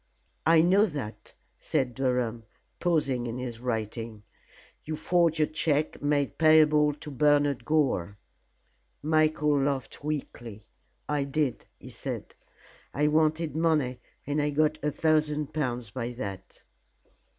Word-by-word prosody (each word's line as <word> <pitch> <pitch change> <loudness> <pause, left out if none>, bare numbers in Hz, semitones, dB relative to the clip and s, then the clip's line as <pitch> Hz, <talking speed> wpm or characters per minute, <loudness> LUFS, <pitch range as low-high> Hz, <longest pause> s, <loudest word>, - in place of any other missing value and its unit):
"I 165 -1 +6
know 195 +5 +4
that," 140 - -7 0.2
said 125 -2 -1
Durham, 125 -3 -1 0.3
pausing 140 -8 0
in 115 +1 -4
his 125 -2 -5
writing. 115 -2 -4 0.6
"You 155 - -4
forged 165 0 +2
a 155 - +4
check 155 -1 -1
made 145 -1 0
payable 155 -2 +5
to 150 0 -9
Bernard 145 0 +2
Gore." 130 - 0 0.9
Michael 155 -2 +2
laughed 135 -1 -2
weakly. 120 -8 -5 0.4
"I 145 -2 0
did," 140 -3 -2
he - - -12
said. - - -6 0.6
"I 150 +1 +2
wanted 155 0 +1
money 155 -6 +1 0.3
and 145 +2 0
I 145 - +1
got 155 +1 +1
a 150 - +2
thousand 150 -1 0
pounds 125 -7 -2
by 120 +1 -4
that." 100 -5 -7
145 Hz, 125 wpm, -28 LUFS, 125-155 Hz, 0.9 s, I